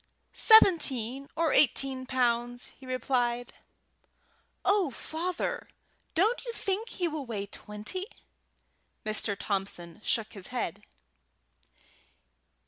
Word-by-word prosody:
"Seventeen 275 - +5
or 330 -1 +2
eighteen 265 -1 +3
pounds," 245 -1 0
replied 250 -2 -1
he. - - -27 1.0
"Oh, 395 -5 +3
Father! 335 +7 -3 0.5
don't 425 +9 +2
you 480 - -4
think 410 +2 -2
he 355 - -1
will 305 -4 -4
weigh 205 -4 -3
twenty?" 210 - -6 1.0
Mr. 215 -1 -1
Thompson 190 -3 -4
shook 225 -1 0
his 195 -4 -6
head. 245 -9 -3
255 Hz, 95 wpm, -29 LUFS, 225-335 Hz, 1.0 s, Seventeen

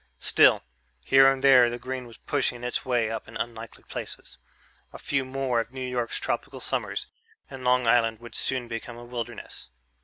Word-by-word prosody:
Still, - - +5 0.4
here 135 0 +7
and 135 0 -3
there 130 -3 +7
the 120 - -4
green 130 0 -5
was 115 - -13
pushing 125 -4 -1
its 125 - -2
way 120 -3 +1
up 115 - -5
in - - -7
unlikely 115 -1 -6
places. - - -7 0.5
A - - -9
few 135 -2 -1
more 130 -2 -1
of 115 +1 -3
New 130 -1 -5
York's 125 -2 -2
tropical - - -3
summers, - - -2 0.5
and 135 -1 -8
Long 125 0 +3
Island 115 -1 +3
would 120 0 -11
soon 130 -2 -1
become 115 +1 -6
a 120 - -10
wilderness. 120 -1 -6
125 Hz, 180 wpm, -26 LUFS, 115-130 Hz, 0.5 s, here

